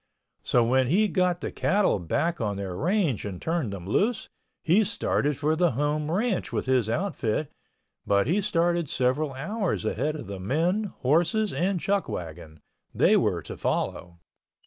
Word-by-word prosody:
So 120 - +2
when 130 +2 +2
he 185 - +3
had 210 - -1
got 180 -1 +1
the - - -3
cattle 195 - +1
back 165 - -1
on 105 -3 -1
their 95 -2 -4
range 170 - 0
and 95 -4 -5
turned 160 -9 -1
them 95 -3 -7
loose, 205 - 0 0.3
he 185 +7 +4
started 150 - 0
for 155 +2 +1
the 170 -3 +2
home 150 +3 -1
ranch 200 +4 -1
with - - -2
his 130 -4 +2
outfit, 150 - -1 0.6
but 100 0 +3
he 180 +10 +1
started 170 -5 +1
several 130 +4 0
hours 195 +8 -2
ahead 155 +1 -1
of 155 - -7
the 100 0 -7
men, 165 - 0 0.2
horses 170 - +2
and 185 +1 0
chuckwagon—they 85 - -2
were - - +1
to - - -7
follow. 85 -1 -2
155 Hz, 160 wpm, -26 LUFS, 115-185 Hz, 0.6 s, he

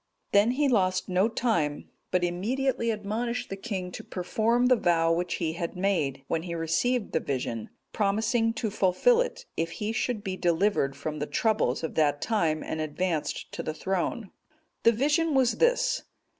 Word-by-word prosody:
Then 205 +3 +5
he 285 +2 +2
lost 185 -7 +1
no 185 +3 +3
time, 170 -12 0 0.2
but 180 -1 +1
immediately 230 +8 0
admonished 225 +3 -2
the - - -2
king 195 -3 -4
to - - -7
perform 225 +6 0
the 255 0 +6
vow 165 -6 +2
which 175 +1 -1
he 160 -2 -2
had 170 +1 -4
made, 160 -9 0
when 160 - 0
he 170 0 -5
received 200 +9 0
the - - +1
vision, 120 -5 -3 0.2
promising 225 +3 +1
to 220 -1 -2
fulfil 210 - +3
it, - - -4
if 165 0 -2
he 210 +1 -3
should 225 -2 -2
be 190 -3 -3
delivered 175 -5 +1
from 150 +2 -5
the 150 - -2
troubles 215 - +1
of 160 - -3
that 145 -2 +2
time, 165 -8 0
and 160 - -3
advanced 155 +1 -2
to - - -4
the 155 - -4
throne. 190 +4 -2 0.5
The 230 - +6
vision 295 +6 +1
was 255 -2 +3
this. - - +3
195 Hz, 170 wpm, -27 LUFS, 165-235 Hz, 0.5 s, the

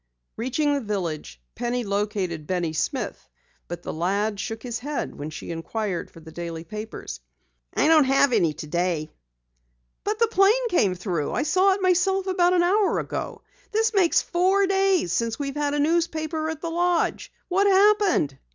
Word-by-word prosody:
Reaching 290 +5 0
the 285 - 0
village, 170 - -4
Penny 245 +1 -2
located 200 -6 -2
Benny 175 -3 -1
Smith, 155 - -3 0.4
but 175 0 -7
the - - -5
lad 200 +5 -1
shook 225 +1 -5
his 240 -2 -4
head 290 +3 -4
when 145 +2 -6
she 155 - -7
inquired 180 +2 -3
for - - -15
the 160 0 -12
daily 165 -1 -6
papers. 210 - -7 0.6
"I - - +3
don't 315 -3 +6
have 270 0 +3
any 170 -8 +3
today." 165 0 -2 0.9
"But 420 +1 -1
the 460 - +4
plane 445 +4 +3
came 200 - +2
through! 175 -5 -2
I - - 0
saw 375 +5 +3
it 385 0 -4
myself 370 +1 +2
about 365 -2 +2
an 350 -1 +3
hour 395 +3 +2
ago. - - -4 0.3
This 445 +1 +1
makes 370 -5 +3
four 380 +3 +2
days 385 - +2
since 230 +1 -1
we've 275 -1 -3
had 290 -1 0
a - - 0
newspaper 315 0 0
at 320 -1 -5
the 335 - -3
lodge. 350 0 0 0.2
What 390 +3 +2
happened?" 395 - +3
275 Hz, 170 wpm, -24 LUFS, -, 0.9 s, don't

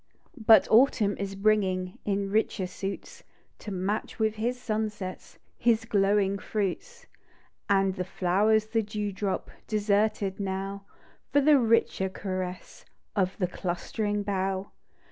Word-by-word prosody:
But 225 -2 +8
autumn 220 -4 +4
is 195 0 -4
bringing, 190 -3 +1
In 200 -1 -1
richer 215 -2 +1
suits, 195 - -6 0.4
To 210 - -7
match 195 +3 -2
with 220 -1 +1
his 240 +3 -1
sunsets, 215 -5 -4 0.2
His 225 -1 +2
glowing 200 -2 +2
fruits; 215 - -3 0.6
And 195 -1 +3
the 185 -1 -3
flowers 200 +4 +2
the 225 +1 0
dew 210 -1 -3
drop 195 0 -3 0.2
Deserted 205 -2 +1
now, 195 0 -4 0.5
For 285 - +4
the 290 0 +5
richer 225 -5 +2
caress 185 -1 -5 0.2
( - - -46
)f 190 -2 0
the 185 - +1
clustering 205 +4 -2
bough. 195 -1 -2
200 Hz, 125 wpm, -28 LUFS, 190-220 Hz, 0.6 s, But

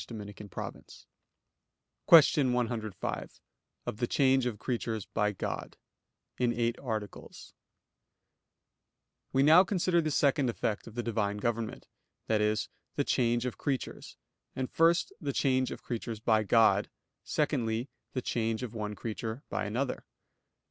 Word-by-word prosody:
_______________________ 105 -3 -8 1.0
QUESTION 145 -5 +7
105 115 -5 -3 0.5
OF - - -4
THE 120 +1 0
CHANGE 130 -1 +3
OF 115 -4 -3
CREATURES 115 -3 -3
BY 105 +1 0
GOD - - -5 0.6
(In 125 -1 +3
Eight 120 0 0
Articles) 110 -6 -6 1.8
We 135 - +3
now 160 +5 +8
consider 180 -2 +1
the 155 - -1
second 140 -2 +2
effect 110 -2 -2
of 115 - -11
the 120 - -2
Divine 105 -3 -1
government, 115 +1 -3 0.4
i.e. 105 -1 +3 0.4
the - - +1
change 120 -1 +1
of 125 - -4
creatures; 135 -3 -3 0.4
and 130 -1 -3
first, 165 +2 +3
the 145 -3 -1
change 130 -1 +2
of - - -8
creatures 115 -2 -4
by 110 -1 +3
God; 110 +2 +4 0.3
secondly, 120 -5 0 0.3
the 130 - -2
change 115 0 -1
of 120 -3 -5
one 105 -2 -4
creature 110 +4 -5
by - - -2
another. 125 +6 -2
120 Hz, 130 wpm, -30 LUFS, 110-130 Hz, 1.8 s, now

